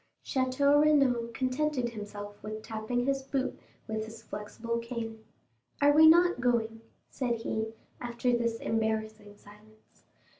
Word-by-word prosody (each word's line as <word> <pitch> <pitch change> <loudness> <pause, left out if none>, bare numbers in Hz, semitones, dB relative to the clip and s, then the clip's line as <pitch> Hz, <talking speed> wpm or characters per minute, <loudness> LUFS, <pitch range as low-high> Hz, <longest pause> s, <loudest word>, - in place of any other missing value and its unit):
Château 280 +2 +3
Renaud 270 -6 +3
contented 255 +1 -1
himself 205 -2 -8
with 215 0 -6
tapping 225 +3 -2
his 275 0 +1
boot 265 0 -2 0.3
with 220 0 -2
his 225 +1 -11
flexible 230 +3 -4
cane. 230 -2 -6 0.6
"Are 285 0 +6
we 315 +2 +8
not 345 -3 +5
going?" 225 -2 0 0.3
said 245 -3 -1
he, 220 0 -3 0.2
after 240 0 0
this 235 -1 0
embarrassing 220 -2 -2
silence. 215 +2 -20
235 Hz, 125 wpm, -30 LUFS, 220-260 Hz, 0.6 s, we